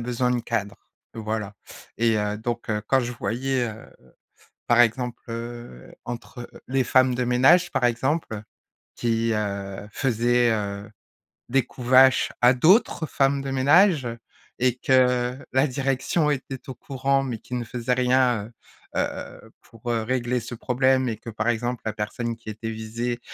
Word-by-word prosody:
besoin 125 +1 -1
de 125 -1 +1
cadre, 110 -4 -3 0.4
voilà. 110 -2 -4 0.4
Et 115 -1 +3
heu, 105 0 -1
donc, 120 +2 -4
heu, 105 -1 -1
quand 135 - +3
je 125 0 -3
voyais, 125 +4 -1
heu, 110 0 -9 0.9
par 120 - +4
exemple, 120 +1 0
heu, 115 - -7
entre 120 +1 -7 0.2
les 130 0 +1
femmes 130 0 +3
de 125 - 0
ménage, 135 +9 +4
par 135 -3 +1
exemple, 120 -1 -1 0.5
qui, 115 -1 0
heu, 100 -1 -4
faisaient, 120 -1 +2
heu, 100 -1 -3 0.6
des 135 +1 +3
coups 125 0 -9
vaches 130 +1 +6
à 125 +1 +7
d'autres 160 - +3
femmes 140 0 +1
de 135 - -4
ménage 145 +2 +4 0.5
et 125 -1 +2
que 125 -1 +2
la 130 +3 +3
direction 135 +3 0
était 135 -1 -4
au 130 - -5
courant, 135 +1 0
mais 125 -4 -4
qui 125 - -8
ne 120 -1 -2
faisait 120 +2 -1
rien, 125 -3 +2 0.5
heu - - +3
heu, - - -5
pour, 115 +1 -8
heu, 115 -1 0
régler 125 +1 -1
ce 120 - -7
problème 130 +2 +1
et 110 -3 -3
que, 115 - -12
par 110 +1 -2
exemple, 120 +1 -1
la 110 - 0
personne 115 +2 -3
qui 115 -1 -14
était 110 +1 -5
visée 115 +2 -4
120 Hz, 160 wpm, -24 LUFS, 115-130 Hz, 0.9 s, à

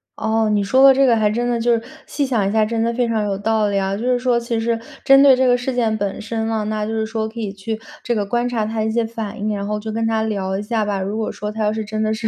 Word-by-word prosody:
哦， 220 0 0
你 205 -1 +1
说 260 +7 +3
的 275 - +9
这 270 +1 +3
个 240 -3 +4
还 215 -2 +2
真 240 +3 -1
的 240 -1 0
就 240 +1 +2
是 230 0 -1 0.2
细 285 - -1
想 225 -7 0
一 - - -1
下 215 0 +3
真 225 +1 -2
的 230 +1 +1
非 245 +1 +1
常 220 -2 0
有 195 -1 -2
道 215 +1 +1
理 200 -1 0
啊， 195 0 -1
就 210 - -6
是 250 0 +2
说 245 -1 +1
其 235 0 -3
实 230 0 0 0.3
针 275 0 +7
对 275 -2 +7
这 260 0 +2
个 245 - +4
事 250 +1 -3
件 225 -3 +1
本 200 -1 -3
身 225 0 -3
呢， 220 -1 -1
那 215 0 -2
就 - - -3
是 220 0 -1
说 220 0 -3
可 230 +1 -9
以 210 -3 -3
去 215 +3 -5 0.2
这 240 - -1
个 205 -2 -1
观 240 +4 0
察 225 -3 -1
他 220 +1 -2
一 220 - 0
些 230 +1 0
反 225 -2 -6
应， 210 +1 -1
然 200 -1 -3
后 210 0 -1
就 220 +1 -5
跟 225 +1 -1
他 220 -1 0
聊 195 -3 -2
一 200 - -4
下 220 0 -1
吧。 200 -2 -1
如 195 +3 -3
果 220 - -2
说 210 0 -5
他 220 +1 -5
要 210 - +2
是 220 0 -3
真 215 +1 -3
的 215 0 +1
是， 220 0 -2
220 Hz, 345 characters per minute, -20 LUFS, 210-235 Hz, 0.3 s, 的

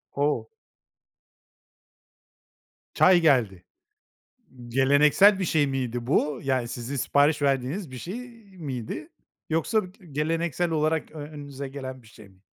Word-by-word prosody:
O! 145 +1 0 2.5
Çay 180 -1 +5
geldi. 115 - +2 1.0
Geleneksel 145 - +5
bir 190 - -1
şey 155 -3 +2
miydi 125 -3 -3
bu? 145 0 +1
Yani 130 -3 0
sizin 120 +3 -5
sipariş 145 +3 +2
verdiğiniz 140 +5 0
bir 130 - -8
şey 230 - -6 0.3
miydi? 130 -8 -5 0.4
Yoksa 165 +7 +1
b 185 +1 -15
geleneksel 165 +3 -1
olarak 155 0 0
ö 160 - -9
önünüze 145 -2 -7
gelen 130 -2 -7
bir - - -20
şey 110 -2 -15
mi? 95 -1 -24
145 Hz, 120 wpm, -26 LUFS, 130-160 Hz, 2.5 s, Çay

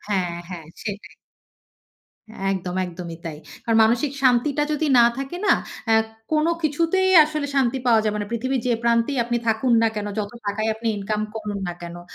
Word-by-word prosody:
হ্যা, 205 -2 +1 0.3
হ্যা 180 -2 -6 0.2
সেইটাই। 205 -1 -7 1.4
একদম, 180 -2 -4
একদমই 170 -2 -7
তাই। 160 -2 -5 0.3
কারণ 230 -2 +2
মানসিক 240 +5 +1
শান্তিটা 265 +3 +3
যদি 305 +1 0
না 235 - +8
থাকে 275 +5 -4
না - - +6 0.3
অ্যা 225 -1 +5 0.3
কোনো 310 +2 +3
কিছুতেই 335 +5 +1
আসলে 305 -1 -3
শান্তি 265 -1 +2
পাওয়া 230 -2 +5
যাবে 210 -1 0
না। 205 - -3
পৃথিবীর 255 +3 -1
যে 245 - +2
প্রান্তেই 235 +3 +2
আপনি 240 0 -1
থাকুন 225 +3 +2
না 225 - +4
কেনো, 205 -1 -3
যত 205 -1 -2 0.2
টাকাই 215 +2 -1
আপনি 225 +1 -3
ইনকাম 210 +2 -2
করুন 210 -2 -4
না - - -2
কেনো। 175 0 -8
230 Hz, 175 wpm, -23 LUFS, 205-270 Hz, 1.4 s, না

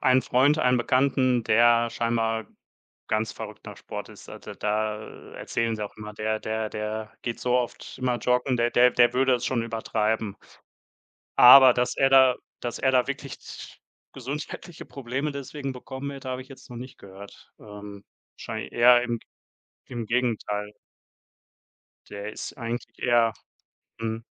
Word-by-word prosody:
einen 130 -1 +4
Freund, 140 +5 +3
einen 125 -4 +3
Bekannten, 130 0 +2
der 120 +1 +4
scheinbar 115 -1 -1 0.6
ganz 110 0 0
verrückt - - -9
nach - - -9
Sport - - -8
ist. - - -13
Also, - - -9
da 105 0 -1 0.4
erzählen 115 -1 -2
sie 105 - -4
auch 105 - -8
immer: 105 0 -8
Der 110 +1 -2
der 110 0 -3
der 110 0 -5
geht 120 -1 -4
so 125 0 0
oft 125 -1 -3
immer 125 -1 0
joggen, 125 +1 +1
der 120 0 +1
der 125 +1 +5
der 120 0 +4
würde 130 0 +3
es 125 0 -4
schon 120 -3 0
übertreiben. 110 -2 -2 1.0
Aber 130 0 +10
dass 125 0 0
er 135 - +4
da 130 -1 +6 0.2
dass 120 - -4
er 130 - +2
da 125 -1 +3
wirklich 140 0 -6
z - - -11 0.4
gesundheitliche 150 +6 -7
Probleme 135 +3 -4
deswegen 140 0 -5
bekommen 130 +2 -7
wird, 140 -1 -9
hab' 130 -1 -3
ich 130 - -12
jetzt 135 -2 -14
noch 120 - -8
nicht 125 +2 -9
gehört. 100 +1 -14
Ähm, 105 -1 -11 0.3
wahrscheinlich - - -6
eher 120 +1 +6
im 120 -2 -3 0.7
im 120 -3 -5
Gegenteil. 110 -4 -1 1.4
Der 100 +1 -7
ist - - -7
eigentlich 120 0 -4
eher 120 -2 +3 0.7
mhm. 115 0 -4
120 Hz, 155 wpm, -26 LUFS, 110-130 Hz, 1.4 s, Aber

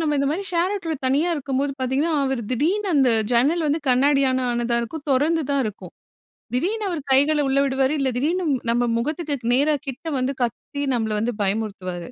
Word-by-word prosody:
நம்ம 305 -2 +1
இந்த 280 0 +1
மாரி 375 +6 -2
ஷேர் 350 +3 +1
ஆட்டோல 330 -5 -3
தனியா 295 +7 +2
இருக்கும்போது 275 0 -1
பாத்தீங்கன்னா, 270 +6 0
அவரு 265 -3 -1
திடீர்னு 370 - 0
அந்த 265 -3 +4 0.2
ஜன்னல் 300 +7 +2
வந்து 310 +3 0
கண்ணாடியால 260 0 +3
ஆனதா 235 0 0
இருக்கும், 285 +6 -7
தொறந்து 310 +5 +2
தான் 280 -1 +2
இருக்கும், 210 - -8 0.6
திடீர்னு 410 - -1
அவரு 335 -4 -3
கைகள 290 +3 +3
உள்ள 275 +1 +2
விடுவாரு, 265 +1 +1
இல்ல 270 -1 +1
திடீர்னு, 345 +7 0 0.3
நம்ம 240 +1 +1 0.2
முகத்துக்கு 285 -3 -2
நேரா 295 +3 +3
கிட்ட 270 +5 -7
வந்து 255 +2 -1
கத்தி, 285 +4 -4
நம்மள 220 -2 -1
வந்து 235 +3 -1
பயமுறுத்துவாரு! 195 -3 -3
275 Hz, 175 wpm, -22 LUFS, 250-315 Hz, 0.6 s, அந்த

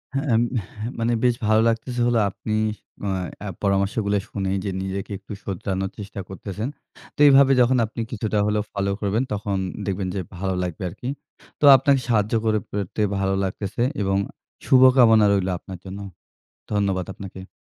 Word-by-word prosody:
হ্যাঁ 135 - 0
এম 110 - +4 0.4
হ্যাঁ 110 +3 -3
মানে 115 +1 +1
বেশ 120 -1 +4
ভালো 110 0 +4
লাগতেছে 120 +2 -2
হলো 120 -2 +3
আপনি 105 +2 -5 0.9
অ্যা 105 - -5
পরামর্শগুলো 100 +1 +1
শুনেই 95 -1 -2
যে 100 - -1
নিজেকে 95 +1 -4
একটু 100 +1 -10
শোধরানোর 95 0 -3
চেষ্টা 100 -1 -7
করতেছেন। 100 +3 -5 0.5
তো - - -22
এইভাবে 135 -1 +7
যখন 125 +2 +4
আপনি 115 +2 -6
কিছুটা 110 -2 -2
হলেও 105 0 +1
ফলো 100 -1 -1
করবেন, 105 +5 +1
তখন 100 -1 -2 0.3
দেখবেন 95 -1 -2
যে 95 - -1 0.2
ভালো 95 +1 -1
লাগবে 90 0 -4
আরকি। 105 +7 -8 0.5
তো - - +3
আপনাকে 135 +1 +3
সাহায্য 110 -2 +1
করে 110 -1 +2
পেরে 100 +1 -3 0.2
ভালো 95 0 +1
লাগতেছে 100 +4 -3 0.2
এবং 95 -1 +1 0.5
শুভকামনা 125 -4 +6
রইলো 95 -2 +1
আপনার 95 -2 -9
জন্য। 95 +2 -7 0.7
ধন্যবাদ 100 -3 0
আপনাকে। 95 -1 -9
105 Hz, 155 wpm, -23 LUFS, 95-115 Hz, 0.9 s, এইভাবে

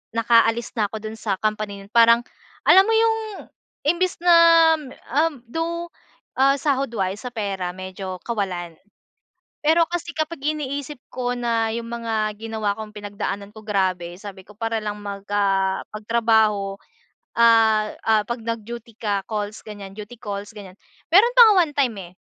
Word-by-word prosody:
Nakaalis 230 0 +3
na 210 -2 +1
ako - - -8
dun 220 +1 -6
sa 200 -3 -1
company 215 0 -2
na - - -14
yun." 200 - -22
Parang 230 0 +6 0.5
alam 385 +1 +7
mo 450 - +2
yung 450 0 +3 0.7
imbes 345 +4 +1
na, 350 -1 +6 0.9
um, 285 -7 -9
though, 335 +6 -4 0.5
ah, 275 +1 +5
sahod 275 -1 0
wise 195 +1 -2
sa 250 - -5
pera 200 -6 -3
medyo 185 0 -6
kawalan. 185 -7 -3 0.9
Pero 320 +3 +5
kasi 345 0 -4
kapag 315 +1 -3
iniisip 285 -2 -3
ko 245 -1 -2
na 230 -2 0
yung 230 0 -5
mga 220 -3 -2
ginawa 220 -2 -2
kong 215 -1 -7
pinagdaanan 205 -1 -5
ko 215 0 -14
grabe 185 -4 -1
sabi 195 -2 -10
ko 210 - -14
para 225 +1 -2
lang 210 -1 -5
mag, 200 -1 -7
ah, 195 -2 +1
magtrabaho. 215 -2 +1 0.6
Ah, 225 -2 +4 0.2
ah, 220 -1 +4
'pag 235 +4 -4
nag-duty 230 +1 -6
ka, 205 -3 -2
calls 210 -1 -4
ganyan, 205 -2 -8
duty 210 +4 -10
calls 205 -2 -7
ganyan, 195 -2 -11 0.3
meron 445 +8 +5
pa - - +9
nga - - +5
one 295 - -10
time, 265 -5 +1
eh, 175 -2 -9
220 Hz, 160 wpm, -22 LUFS, 205-245 Hz, 0.9 s, pa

